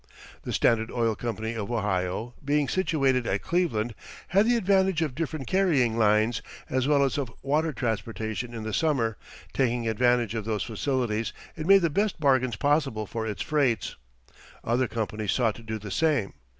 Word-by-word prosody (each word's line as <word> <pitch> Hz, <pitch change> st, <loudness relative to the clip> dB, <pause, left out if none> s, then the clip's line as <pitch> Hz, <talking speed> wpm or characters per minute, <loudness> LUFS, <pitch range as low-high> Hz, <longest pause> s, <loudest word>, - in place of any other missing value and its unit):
The -, -, -5 dB
Standard 110 Hz, -1 st, +2 dB
Oil 115 Hz, -2 st, +1 dB
Company 110 Hz, 0 st, -4 dB
of 110 Hz, 0 st, -4 dB
Ohio, 105 Hz, +1 st, -1 dB
being 145 Hz, 0 st, +1 dB
situated 135 Hz, -9 st, +1 dB
at -, -, -1 dB
Cleveland, 120 Hz, -11 st, 0 dB, 0.4 s
had 200 Hz, +4 st, +4 dB
the 240 Hz, -, +4 dB
advantage 190 Hz, -5 st, +2 dB
of 150 Hz, -5 st, -2 dB
different 155 Hz, -1 st, -3 dB
carrying 155 Hz, -12 st, +2 dB
lines, 110 Hz, +1 st, +3 dB, 0.3 s
as 130 Hz, 0 st, +1 dB
well 145 Hz, -1 st, +4 dB
as 140 Hz, +2 st, 0 dB
of 130 Hz, -5 st, -3 dB
water 155 Hz, +4 st, +1 dB
transportation 115 Hz, -1 st, -3 dB
in 115 Hz, -2 st, -6 dB
the 110 Hz, -1 st, -4 dB
summer; 125 Hz, -8 st, +1 dB, 0.4 s
taking 120 Hz, -3 st, 0 dB
advantage 120 Hz, 0 st, +2 dB
of 110 Hz, -2 st, -2 dB
those 105 Hz, -2 st, -1 dB
facilities, 115 Hz, -2 st, -1 dB, 0.2 s
it 155 Hz, 0 st, -5 dB
made 195 Hz, -1 st, +7 dB
the 165 Hz, -, +2 dB
best 205 Hz, +4 st, 0 dB
bargains 130 Hz, -5 st, +2 dB
possible 135 Hz, -4 st, +1 dB
for 110 Hz, +2 st, -4 dB
its 105 Hz, -, -3 dB
freights. 130 Hz, -, 0 dB, 0.7 s
Other 120 Hz, +2 st, +1 dB
companies 110 Hz, -2 st, -2 dB
sought 115 Hz, -4 st, +2 dB
to 115 Hz, -, -12 dB
do 110 Hz, -1 st, -4 dB
the 105 Hz, -2 st, -8 dB
same. 150 Hz, -, +1 dB
120 Hz, 170 wpm, -27 LUFS, 110-150 Hz, 0.7 s, made